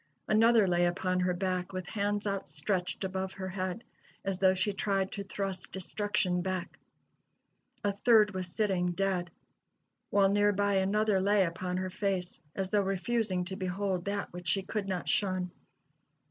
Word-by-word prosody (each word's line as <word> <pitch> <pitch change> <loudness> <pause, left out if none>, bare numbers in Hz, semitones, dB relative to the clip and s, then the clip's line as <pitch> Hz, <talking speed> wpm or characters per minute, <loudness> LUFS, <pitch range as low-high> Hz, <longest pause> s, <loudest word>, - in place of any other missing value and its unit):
Another 220 -1 +5
lay 175 -1 +3
upon 185 +1 0
her 180 0 +2
back, 185 0 -2
with 185 -1 -3
hands 205 +1 -1
outstretched 185 0 -2
above 190 0 -2
her 190 0 -5
head, 185 +4 -3 0.4
as 195 -1 -1
though 190 -1 +5
she 190 +2 0
tried 195 -1 0
to 200 - -4
thrust 195 -1 -4
destruction 190 -1 -1
back. 185 -1 -3 1.0
A 205 -1 +1
third 210 0 +5
was 185 -1 -3
sitting, 180 -2 0
dead; 185 -2 0 0.8
while 195 -1 +4
near 205 +1 +3
by 200 0 +1
another 200 +1 +2
lay 200 +1 +4
upon 180 +1 -3
her 185 0 -2
face, 190 -2 -2
as 190 -1 -2
though 210 - +4
refusing 195 -1 0
to 190 +1 -5
behold 190 -1 -2
that 200 -2 -3
which 175 -1 -8
she 195 +3 +2
could 205 +1 -3
not 185 -2 -3
shun. 185 -3 0
190 Hz, 160 wpm, -31 LUFS, 185-205 Hz, 1.0 s, Another